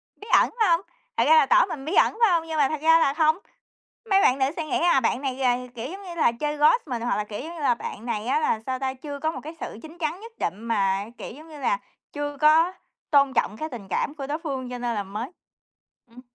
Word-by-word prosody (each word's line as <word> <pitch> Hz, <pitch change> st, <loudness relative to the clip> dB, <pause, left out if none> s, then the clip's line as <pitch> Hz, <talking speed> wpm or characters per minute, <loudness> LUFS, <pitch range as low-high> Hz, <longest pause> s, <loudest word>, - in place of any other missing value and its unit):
Bí 420 Hz, -, -13 dB
ẩn, -, -, +6 dB
phải 435 Hz, -4 st, +4 dB
hông? 335 Hz, 0 st, +3 dB, 0.4 s
Thật -, -, +4 dB
ra 480 Hz, -, +6 dB
là 470 Hz, -, +6 dB
tỏ -, -, +5 dB
mình 285 Hz, -8 st, -7 dB
bí 320 Hz, -, -3 dB
ẩn, -, -, +5 dB
phải 455 Hz, -4 st, +5 dB
hông? 330 Hz, -2 st, +1 dB
Nhưng 320 Hz, -1 st, -3 dB
mà 285 Hz, -3 st, +3 dB
thật 310 Hz, -2 st, -3 dB
ra 325 Hz, +1 st, +6 dB
là 275 Hz, -4 st, +2 dB
không. 315 Hz, +1 st, +3 dB, 0.7 s
Mấy 390 Hz, 0 st, +5 dB
bạn 255 Hz, -, +4 dB
nữ 265 Hz, -, +3 dB
sẽ 325 Hz, -, -2 dB
nghĩ 305 Hz, -, -1 dB
là 345 Hz, -6 st, +4 dB
bạn 240 Hz, +1 st, 0 dB
này 270 Hz, -2 st, -1 dB
gà 255 Hz, -2 st, +2 dB, 0.2 s
kiểu 240 Hz, +1 st, -5 dB
giống 390 Hz, +1 st, -8 dB
như 360 Hz, -3 st, -8 dB
là, 315 Hz, -8 st, +3 dB
chơi 295 Hz, +5 st, -3 dB
ghost 310 Hz, +11 st, +4 dB
mình, 245 Hz, -5 st, -4 dB
hoặc 240 Hz, -, 0 dB
là, 210 Hz, -, -1 dB
kiểu 210 Hz, 0 st, -7 dB
giống 325 Hz, +6 st, -7 dB
như 330 Hz, -, -8 dB
là, 260 Hz, -4 st, +3 dB
bạn 230 Hz, -1 st, -7 dB
này 220 Hz, -2 st, -3 dB
á 280 Hz, +5 st, +2 dB
là, 225 Hz, -8 st, +1 dB
sao 260 Hz, -1 st, -2 dB
ta, 265 Hz, 0 st, -2 dB
chưa 285 Hz, +2 st, -7 dB
có 315 Hz, +3 st, 0 dB
một -, -, -7 dB
cái 315 Hz, +3 st, -8 dB
sự -, -, -6 dB
chín 320 Hz, +2 st, -12 dB
chắn 330 Hz, +2 st, -2 dB
nhất 455 Hz, +2 st, -11 dB
định 190 Hz, +5 st, -3 dB
mà, 200 Hz, -4 st, +1 dB
kiểu -, -, -7 dB
giống 305 Hz, +6 st, -13 dB
như 305 Hz, -2 st, -11 dB
là, -, -, 0 dB, 0.3 s
chưa 290 Hz, 0 st, -4 dB
có 320 Hz, +4 st, +5 dB, 0.4 s
tôn 280 Hz, -2 st, +4 dB
trọng 210 Hz, -, 0 dB
cái 310 Hz, +6 st, -4 dB
tình 230 Hz, -9 st, -9 dB
cảm 285 Hz, -, -1 dB
của 280 Hz, -3 st, -6 dB
đối 295 Hz, +3 st, -2 dB
phương 270 Hz, -6 st, -5 dB
cho 250 Hz, -, -5 dB
nên 240 Hz, -1 st, -2 dB
là 205 Hz, -, -1 dB
mới 210 Hz, +7 st, -6 dB, 0.8 s
ừm. 240 Hz, +2 st, -13 dB
290 Hz, 280 wpm, -25 LUFS, 245-325 Hz, 0.8 s, ẩn